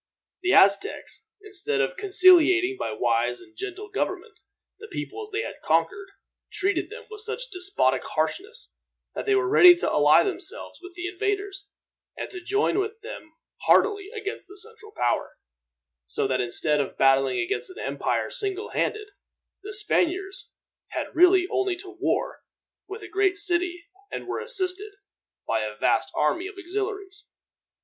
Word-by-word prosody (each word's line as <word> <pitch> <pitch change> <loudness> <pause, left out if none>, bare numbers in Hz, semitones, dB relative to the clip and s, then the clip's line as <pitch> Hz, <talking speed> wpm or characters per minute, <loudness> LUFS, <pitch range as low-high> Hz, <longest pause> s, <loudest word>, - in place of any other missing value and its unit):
The 365 0 +1
Aztecs, 200 - +3 0.2
instead 415 +1 -1
of - - 0
conciliating 370 -2 +5
by - - -2
wise 120 +1 0
and 335 - -18
gentle 400 +3 -6
government 425 +2 -3 0.5
the 440 - -10
peoples 425 +1 -6
they 425 +2 -2
had - - -8
conquered, 390 0 0 0.4
treated 405 -1 0
them - - -10
with 425 -1 -8
such - - -4
despotic 360 - +1
harshness 395 - -3 0.4
that - - -5
they 410 - +4
were 380 -2 +2
ready 360 -3 +8
to 345 - -2
ally 150 +1 +5
themselves 385 +4 -4
with 365 -1 -12
the 355 0 -5
invaders, 400 +1 -3 0.5
and - - -5
to 365 - -7
join 405 +3 +1
with 425 +2 -3
them 420 -8 -9 0.4
heartily 405 -2 +3
against 425 -3 -6
the 395 +2 -13
central 435 +1 -8
power; 120 - -1 0.7
so 70 - 0
that 130 -1 0
instead 145 +5 +2
of 135 - -6
battling 135 -1 +3
against 120 - -1
an 370 - -12
empire - - -2
single 405 -4 -1
handed, 425 -1 -2 0.5
the 410 +2 -8
Spaniards 385 -2 0 0.4
had - - -5
really 360 +1 +5
only 380 -1 0
to 375 +1 -10
war - - -1 0.5
with 405 +3 -8
a - - -7
great 390 -1 +1
city, 355 -3 +2 0.3
and - - -5
were - - -3
assisted 410 -3 -2 0.5
by - - +1
a - - -6
vast - - +1
army 355 +2 +1
of 405 - -10
auxiliaries. 395 +2 -5
390 Hz, 155 wpm, -25 LUFS, 355-415 Hz, 0.7 s, ready